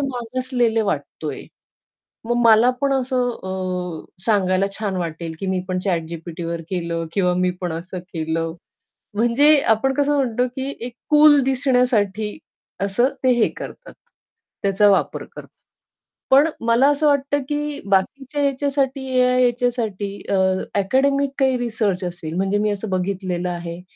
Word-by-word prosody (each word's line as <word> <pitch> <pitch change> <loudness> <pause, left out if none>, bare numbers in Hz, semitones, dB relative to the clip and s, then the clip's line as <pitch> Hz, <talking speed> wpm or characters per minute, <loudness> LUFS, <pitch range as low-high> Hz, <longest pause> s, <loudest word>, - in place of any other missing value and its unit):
मागासलेले 245 -3 -1
वाटतोय. 205 - -4 0.8
मग 240 +1 0
मला 225 +2 +6
पण 275 -1 +2
असं 255 -1 0
अ, 185 -3 -4 0.2
सांगायला 195 -3 +2
छान 200 -3 -2
वाटेल 165 -1 -4
की 195 - -4
मी 185 -1 0
पण 185 0 -1
ChatGPTवर 170 -1 -3
केलं 170 -2 -2
किंवा 180 -3 +2
मी 180 0 +1
पण 175 -2 -2
असं 180 +2 -6
केलं. 165 0 -2 0.6
म्हणजे 260 +7 +5
आपण 265 +5 +3
कसं 290 +1 +1
म्हणतो 250 -2 +1
की 265 +1 -3
एक 240 0 -6 0.2
कूल 300 -1 +7
दिसण्यासाठी 250 -6 +1 0.5
असं 220 +6 +2 0.2
ते 255 - +5
हे 240 -2 +3
करतात. - - -9 0.7
त्याचा 200 +1 +3
वापर 195 - 0
करतात. - - -12 0.8
पण 275 +4 +6 0.2
मला 235 +4 +4
असं 295 +1 +1
वाटतं 285 0 +2
की 295 0 -3
बाकीच्या 270 +9 0
याच्यासाठी 275 -1 0
या 250 0 +3
याच्यासाठी 240 -5 0 0.2
अ, - - +2 0.5
अकॅडेमिक 275 +6 +2
काही 265 -2 +3
रिसर्च 215 -6 -1
असेल 170 -2 -5
म्हणजे 195 +2 0
मी 210 0 +1
असं 205 0 -4
बघितलेलं 185 -1 -2
आहे 170 0 -5
220 Hz, 135 wpm, -21 LUFS, 185-265 Hz, 0.8 s, कूल